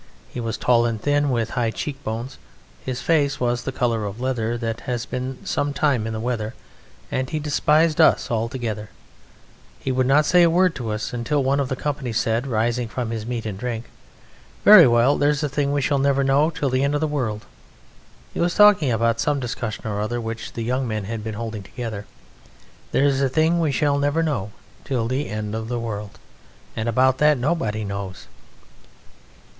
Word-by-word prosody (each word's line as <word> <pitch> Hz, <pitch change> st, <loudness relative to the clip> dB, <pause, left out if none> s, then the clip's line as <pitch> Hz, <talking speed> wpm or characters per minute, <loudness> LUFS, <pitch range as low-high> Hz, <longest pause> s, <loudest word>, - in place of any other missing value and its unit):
He -, -, -4 dB
was 115 Hz, -2 st, -3 dB
tall 120 Hz, -1 st, +3 dB
and 115 Hz, -2 st, -2 dB
thin, 145 Hz, +3 st, +1 dB
with 115 Hz, -3 st, -1 dB
high 120 Hz, -3 st, 0 dB
cheekbones. 125 Hz, -1 st, -5 dB, 0.4 s
His 130 Hz, -1 st, -4 dB
face 145 Hz, -4 st, +2 dB
was 120 Hz, -1 st, 0 dB
the 135 Hz, -, -4 dB
colour 115 Hz, -4 st, 0 dB
of 100 Hz, +3 st, -7 dB
leather 120 Hz, -2 st, -1 dB
that 115 Hz, -1 st, -3 dB
has 120 Hz, -1 st, -2 dB
been 130 Hz, +1 st, -4 dB
some 145 Hz, 0 st, -1 dB
time 135 Hz, -5 st, +1 dB
in 110 Hz, -, -3 dB
the 110 Hz, -, -3 dB
weather, 115 Hz, -1 st, -3 dB, 0.6 s
and 130 Hz, 0 st, -1 dB
he 155 Hz, -, -2 dB
despised 150 Hz, +1 st, +2 dB
us -, -, +4 dB
altogether: 115 Hz, -2 st, -3 dB, 0.9 s
he 130 Hz, -, -2 dB
would 130 Hz, 0 st, +1 dB
not 150 Hz, +3 st, +4 dB
say 180 Hz, +2 st, +5 dB
a 170 Hz, -, +6 dB
word 180 Hz, +1 st, +3 dB
to 120 Hz, -7 st, -5 dB
us, 105 Hz, +3 st, -4 dB
until 130 Hz, +4 st, 0 dB
one 135 Hz, +2 st, +1 dB
of 135 Hz, -2 st, -1 dB
the 130 Hz, -, -1 dB
company 145 Hz, -2 st, -3 dB
said, 115 Hz, +3 st, 0 dB
rising 120 Hz, 0 st, 0 dB
from 120 Hz, 0 st, -4 dB
his 110 Hz, -1 st, -4 dB
meat 120 Hz, -2 st, -3 dB
and 100 Hz, -3 st, -5 dB
drink: 120 Hz, -1 st, -4 dB, 0.7 s
"Very 205 Hz, -8 st, +10 dB
well, 120 Hz, +4 st, +3 dB
there's 145 Hz, +1 st, +2 dB
a -, -, +1 dB
thing 140 Hz, +1 st, 0 dB
we 145 Hz, 0 st, +1 dB
shall 140 Hz, +1 st, +1 dB
never 140 Hz, 0 st, +2 dB
know 140 Hz, +3 st, +3 dB
till 145 Hz, -4 st, -2 dB
the 130 Hz, +1 st, +1 dB
end 140 Hz, +1 st, +1 dB
of 145 Hz, -, -1 dB
the -, -, +2 dB
world" 120 Hz, -8 st, -3 dB, 0.9 s
(he -, -, -5 dB
was 175 Hz, +1 st, +1 dB
talking 205 Hz, -10 st, +6 dB
about 115 Hz, 0 st, +1 dB
some 145 Hz, 0 st, +1 dB
discussion 120 Hz, -4 st, -4 dB
or 105 Hz, -1 st, -2 dB
other 120 Hz, +3 st, -2 dB
which 115 Hz, -1 st, -6 dB
the 115 Hz, -, -4 dB
young 125 Hz, +2 st, -1 dB
men 110 Hz, -2 st, -2 dB
had 110 Hz, +2 st, -5 dB
been 110 Hz, -1 st, -5 dB
holding 110 Hz, -1 st, -5 dB
together). 110 Hz, -1 st, -6 dB, 0.8 s
"There's 140 Hz, -1 st, +2 dB
a 135 Hz, -, +2 dB
thing 160 Hz, +5 st, +2 dB
we 160 Hz, -3 st, +1 dB
shall 140 Hz, 0 st, +1 dB
never 145 Hz, +3 st, +1 dB
know 125 Hz, -11 st, -2 dB, 0.3 s
till 125 Hz, -5 st, -1 dB
the 130 Hz, +4 st, -2 dB
end 110 Hz, -1 st, -4 dB
of 110 Hz, 0 st, -4 dB
the 120 Hz, 0 st, -2 dB
world 105 Hz, -3 st, -5 dB, 0.6 s
and 110 Hz, +1 st, -2 dB
about 130 Hz, +3 st, +3 dB
that 150 Hz, -1 st, +4 dB
nobody 125 Hz, -6 st, -1 dB
knows!" 100 Hz, -2 st, -6 dB
125 Hz, 195 wpm, -22 LUFS, 115-145 Hz, 0.9 s, Very